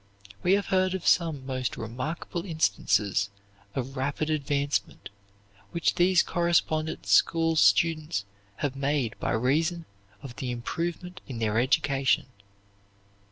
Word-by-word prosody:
We 180 - +3
have 200 0 +1
heard 185 0 +2
of 185 - -5
some 160 -6 +2
most 130 -4 -3
remarkable 145 +9 -4
instances 100 - +1 0.5
of 135 +1 -4
rapid 140 +4 -1
advancement 145 -1 -1 0.6
which 170 -1 +1
these 180 0 +4
correspondence 170 -3 0
school 165 -1 +4
students 155 -6 +3 0.3
have 140 +3 -2
made 140 -4 0
by - - -1
reason 160 +8 +1 0.4
of 130 -3 -9
the 130 - -4
improvement 170 +9 -4
in 130 -5 -6
their 110 -1 +1
education. 135 +1 +2
145 Hz, 115 wpm, -27 LUFS, 130-170 Hz, 0.6 s, these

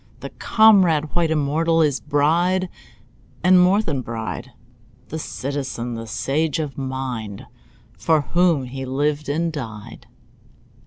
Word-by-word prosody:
The - - -7
comrade, 185 -9 +4
white, 170 -2 +2
immortal, 160 +2 +1
His 145 -3 +2
bride, 170 +6 +1 0.7
and 180 0 +6
more 195 +4 +4
than 145 -9 -2
bride— 115 -2 -5 0.6
The 160 - -4
citizen, 135 -5 -4
the 115 0 -6
sage 150 +7 -1
of 150 -4 -4
mind, 130 -6 -5 0.5
For 160 -2 +2
whom 170 +1 +2
he 135 +1 -6
lived 145 +3 -1
and 165 +3 -1
died. 115 -6 -8
150 Hz, 120 wpm, -21 LUFS, 130-165 Hz, 0.7 s, and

